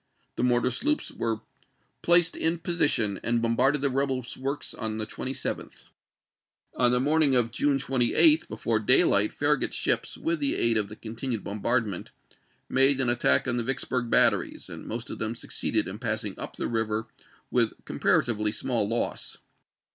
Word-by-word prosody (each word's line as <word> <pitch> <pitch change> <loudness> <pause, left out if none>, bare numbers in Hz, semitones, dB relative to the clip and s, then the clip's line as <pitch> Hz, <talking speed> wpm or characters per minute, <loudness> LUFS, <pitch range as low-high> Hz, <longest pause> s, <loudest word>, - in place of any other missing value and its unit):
The - - -3
mortar 125 0 +2
sloops 300 - -1
were 110 -1 -3 0.6
placed 175 -1 +4
in 165 +1 0
position 145 - 0
and 115 0 +1
bom 115 0 0
barded 135 +4 +2
the 140 - +1
rebel 130 -2 -1
works 140 +2 -4
on 110 -2 -4
the 110 - -3
27th. 130 +4 -5 0.9
On 125 -1 +3
the 125 - +2
morn 150 +5 +2
ing 140 -4 +3
of 120 -2 +2
June 140 +3 +1
28, 135 - +4
before - - -1
daylight, - - +4
Farragut's - - 0
ships, - - -1
with 330 0 -1
the 285 0 +1
aid 115 -1 +2
of 105 -2 +1
the 105 - -9
continued 115 0 -5
bombardment, 105 -1 -2 0.6
made 135 +1 +3
an 130 -2 +2
attack 120 +2 +2
on 120 -1 0
the 120 - -1
Vicksburg 125 -1 -2
batteries, - - +2
and - - -9
most 115 +1 -5
of - - -7
them 110 +1 -2
succeeded - - -2
in 95 +3 -7
passing 110 -4 -2
up - - -7
the - - -3
river 110 -1 -2 0.5
with 115 -3 +1
com - - -7
paratively 105 -3 +2
small 115 -2 -1
loss. 115 +1 -3
120 Hz, 170 wpm, -26 LUFS, 110-135 Hz, 0.9 s, placed